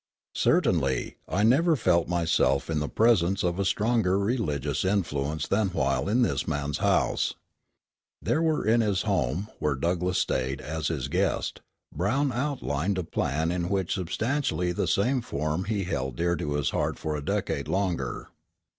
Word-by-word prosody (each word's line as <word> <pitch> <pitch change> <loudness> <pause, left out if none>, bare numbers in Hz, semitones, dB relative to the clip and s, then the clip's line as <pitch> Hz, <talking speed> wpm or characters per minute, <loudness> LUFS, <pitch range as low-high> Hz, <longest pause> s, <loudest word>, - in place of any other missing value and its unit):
Certainly, 65 -2 +1
I 100 - +1
never 160 +9 +4
felt 85 - +2
myself 80 -5 +1
in 80 - +1
the 75 - -2
presence 100 -4 +3
of 90 +2 0
stronger 105 -4 +2
religious 90 - -1
influence 80 -6 -1
than 105 +1 +2
while 70 -3 0
in 120 +4 +3
this - - -1
man's 70 0 -2
house." - - +1 0.8
There 155 - +1
in 115 +2 +3
his 100 -3 +1
own 110 - -2
home, 90 - 0
where 75 -2 0
Douglass 90 +5 0
stayed 65 +1 0
as 80 +1 -3
his 75 -6 -2
guest, - - -1 0.3
Brown 125 - +1
outlined 100 - -1
a 90 - -1
plan 80 +1 -1 0.2
which 95 -3 0
in 95 - -2
substantially 110 - 0
the 90 - -1
same 125 +6 +2
form 75 -2 -2
he 105 -2 -1
held 65 -8 -3
dear 85 +5 +1
to 75 -3 -3
his 75 -1 0
heart - - -1
for 75 -1 -3
a 75 - -4
decade - - -2
longer. 90 -10 -2
90 Hz, 155 wpm, -27 LUFS, 75-105 Hz, 0.8 s, never